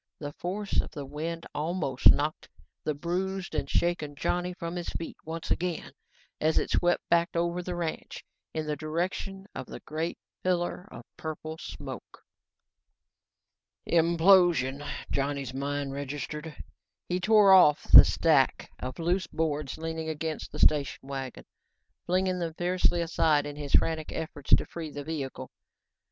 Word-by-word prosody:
The 145 -1 -6
force 195 +5 -1
of - - -9
the 145 -3 -7
wind 160 +4 -5
almost 150 -4 +2
knocked 150 +2 +1 0.3
the 155 - -1
bruised 185 +5 -3
and - - -2
shaken 165 -4 0
Johnny 180 +5 -1
from 170 -1 -6
his 175 -1 -4
feet 165 - -5
once 165 +1 -5
again 180 -1 -1 0.5
as 155 +1 +2
it - - +1
swept 175 0 +1
back 170 0 +3
over 170 +1 0
the 180 0 -4
ranch, 170 -2 -5 0.3
in 155 -1 -3
the 150 0 -1
direction 180 +6 -3
of - - -6
the - - -8
great 160 +2 -3 0.2
pillar 180 +1 -1
of 115 - -9
purple 160 0 -6
smoke. - - -9 1.6
"Implosion," 170 -5 +4 0.3
Johnny's 140 -2 -1
mind 140 0 -2
registered. 145 +3 -5 0.5
He 180 +1 0
tore 205 0 +6
at 155 -6 +7 0.2
the - - +14
stack 150 -5 +2
of 130 0 -5
loose 175 +3 0
boards 150 -3 -2
leaning 160 0 -4
against 155 0 -4
the - - -7
station 145 -2 +2
wagon, 135 -2 -6 0.6
flinging 185 +1 +1
them 165 -2 -3
fiercely 175 0 +1
aside 160 -3 +2
in 145 0 -6
his 145 -1 -6
frantic 160 -1 +2
efforts 145 -3 -6
to - - -2
free 165 -2 -6
the 145 0 -6
vehicle. 145 -3 -5
160 Hz, 145 wpm, -28 LUFS, 145-175 Hz, 1.6 s, the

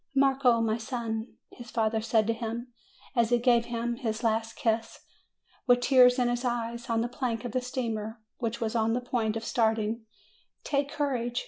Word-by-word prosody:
"Marco, 270 -3 +4
my 225 0 0
son," 225 -1 -4 0.2
his 240 -1 -11
father 220 -2 0
said 220 -1 +2
to 230 - +1
him, 235 +2 -5 0.4
as 235 -2 +3
he 240 - +4
gave 235 -1 +3
him 235 0 -2
his 225 -2 -3
last 225 0 0
kiss, 225 0 -1 0.7
with 245 0 +5
tears 250 -1 +6
in 250 -1 +2
his 240 +1 -1
eyes, 235 -1 -2
on 225 -1 +2
the 235 - 0
plank 245 -2 -3
of 240 - -3
the 255 - 0
steamer, 230 -3 -3 0.2
which 230 -2 -2
was 225 0 -2
on 225 0 +2
the 245 - +1
point 230 -3 -1
of 225 - -6
starting, 220 -1 +1 0.6
"take 280 -1 0
courage. 255 -5 -1
235 Hz, 185 wpm, -28 LUFS, 225-245 Hz, 0.7 s, tears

